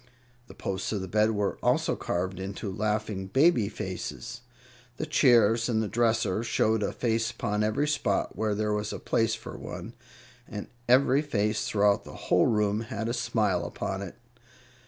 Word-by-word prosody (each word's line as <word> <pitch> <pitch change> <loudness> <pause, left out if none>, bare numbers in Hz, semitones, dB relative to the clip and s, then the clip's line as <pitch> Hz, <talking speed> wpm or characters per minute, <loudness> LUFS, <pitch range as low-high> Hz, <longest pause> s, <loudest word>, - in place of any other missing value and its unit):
The - - -13
posts 95 -1 -3
of 100 - -1
the 95 - -5
bed 105 +3 +3
were 100 -1 -1
also - - +2
carved 90 +1 -2
into 100 +1 -5
laughing 105 -1 -2
baby 135 - +3
faces; 120 - -6 0.6
the 155 - -2
chairs 115 -5 +4
and 110 -2 +2
the 110 - 0
dresser 115 -2 +1
showed 110 -1 +1
a 100 - 0
face 115 -1 0
upon 105 -3 -1
every 110 +8 +1
spot 150 -2 0
where 110 -1 0
there 105 0 0
was 105 0 -2
a - - -4
place 115 -1 +1
for - - -9
one, - - -7 0.5
and 105 -2 -6 0.2
every 135 +2 +5
face 105 -7 0
throughout 100 -1 +3
the - - -11
whole - - +2
room 105 -1 +1
had 115 0 -4
a - - -1
smile 105 -8 0
upon 95 0 -4
it. 95 -3 -7
110 Hz, 170 wpm, -28 LUFS, 100-115 Hz, 0.6 s, every